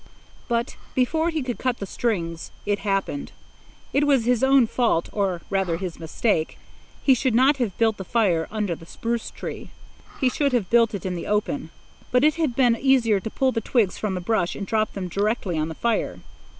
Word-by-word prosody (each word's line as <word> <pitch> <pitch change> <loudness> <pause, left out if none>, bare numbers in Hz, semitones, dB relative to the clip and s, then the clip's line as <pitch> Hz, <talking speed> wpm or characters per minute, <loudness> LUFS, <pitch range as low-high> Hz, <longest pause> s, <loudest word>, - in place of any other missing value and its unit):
But 235 +1 -1 0.2
before 315 +6 +2
he 320 -4 -2
could 250 -2 -4
cut 255 -2 0
the 200 - -5
strings, 170 -7 -2 0.2
it 205 0 0
happened. 200 +7 -2 0.6
It 290 +1 +3
was 270 -5 +3
his 245 0 +2
own 265 -2 +6
fault 230 -7 +1
or, 190 -4 -1
rather, 190 -4 +1
his 180 -2 -5
mistake. 160 +1 -1 0.5
He 270 - +6
should 255 -1 +1
not 270 +4 +5
have 235 -8 -2
built 225 -2 +2
the 190 - -5
fire 185 -7 +1
under 210 -4 -1
the 165 0 -11
spruce 230 +3 -3
tree. - - -7 0.5
He 265 - +3
should 280 +2 +1
have 225 -7 0
built 230 -2 +4
it 195 - -6
in 185 - -1
the 175 - -5
open. 210 +7 -1 0.4
But 250 +1 +3
it 305 0 +5
had 305 -8 0
been 245 -3 +4
easier 235 -5 +3
to 220 - -5
pull 265 +3 +1
the 225 - -1
twigs 220 -4 +1
from 205 -3 -1
the 180 - -3
brush 180 -2 0
and 200 - -4
drop 215 +1 0
them 190 -2 -4
directly 200 -1 -1
on 155 - 0
the 160 - -6
fire. 235 +4 -1
225 Hz, 200 wpm, -24 LUFS, 195-255 Hz, 0.6 s, own